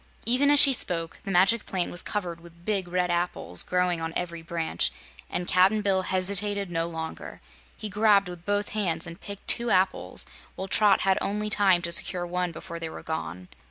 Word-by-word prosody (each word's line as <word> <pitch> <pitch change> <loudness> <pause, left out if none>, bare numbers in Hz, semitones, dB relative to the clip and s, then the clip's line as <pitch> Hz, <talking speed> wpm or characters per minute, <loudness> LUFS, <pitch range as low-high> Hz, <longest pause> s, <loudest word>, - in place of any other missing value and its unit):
Even 255 +5 +4
as 290 0 +6
she 275 -1 +8
spoke, 165 -8 -1
the - - -5
Magic 195 +5 +3
Plant 185 -2 -2
was 175 - 0
covered 175 -5 -4
with 170 0 -17
big 195 -4 -1
red 180 0 -1
apples, 170 - -1
growing 180 -2 0
on 165 0 -4
every 170 -2 -4
branch, 165 0 -1 0.4
and 175 - -4
Cap'n 195 +4 +3
Bill 195 -2 +2
hesitated 200 +1 +1
no 165 0 -1
longer. 160 -1 -7 0.4
He 215 - -5
grabbed 205 -1 +3
with 175 -1 -9
both 205 +2 -1
hands 175 -7 -1
and 170 - -10
picked 200 -1 -9
two 235 0 +1
apples, 190 -2 +1 0.3
while 190 - -5
Trot 210 +1 +3
had 190 -1 +2
only 210 +1 -2
time 190 -5 +3
to 170 - -3
secure 175 +1 +3
one 180 0 -2
before 170 +1 -8
they 165 -1 -5
were - - -9
gone. 90 - -5
180 Hz, 195 wpm, -26 LUFS, 170-205 Hz, 0.4 s, she